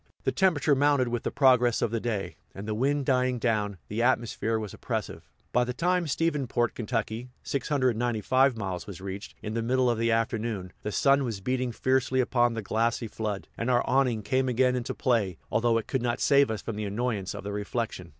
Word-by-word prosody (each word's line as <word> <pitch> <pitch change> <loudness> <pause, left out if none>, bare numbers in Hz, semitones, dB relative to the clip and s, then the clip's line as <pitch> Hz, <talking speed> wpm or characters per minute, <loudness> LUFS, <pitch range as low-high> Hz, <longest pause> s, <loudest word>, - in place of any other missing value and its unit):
The - - +1
temperature 165 -6 +3
mounted 140 -2 +3
with 120 -1 -2
the - - -2
progress 125 -4 +4
of 110 - 0
the 115 - 0
day; 110 -4 -3 0.2
and, 100 +2 -7
the 110 - -1
wind 140 +5 0
dying 125 -1 +2
down, 105 -4 0
the 110 +3 -2
atmosphere 115 -2 +1
was 105 -3 -5
oppressive. - - -5 0.2
By 125 - +3
the 125 0 -3
time 180 +2 +1
Stephensport, 140 -6 0 0.3
Ky. 115 +3 -7
(695 130 -2 +1
miles), 95 -4 -4
was 100 -5 -8
reached, 95 +1 -7
in 105 - -4
the 115 - -1
middle 125 +1 +2
of 115 - -2
the 115 0 +2
afternoon, 115 -4 -1
the 105 - -3
sun 140 +7 +3
was 115 -6 -3
beating 125 +4 -1
fiercely 130 +2 +1
upon 120 -2 +2
the 115 - -4
glassy 115 +3 0
flood, 105 -2 -4
and 115 - -2
our 120 -1 +3
awning 125 -5 +2
came 130 +3 +1
again 125 +1 +2
into 125 0 -3
play, 110 - +1
although 115 0 +2
it 115 - -2
could 130 - -1
not 120 -1 -1
save 140 -3 +4
us 110 -3 -3
from 115 -3 -4
the 105 - -2
annoyance 105 -2 -2
of - - -7
the 100 - -4
reflection. 105 -3 -3
120 Hz, 200 wpm, -28 LUFS, 110-130 Hz, 0.3 s, progress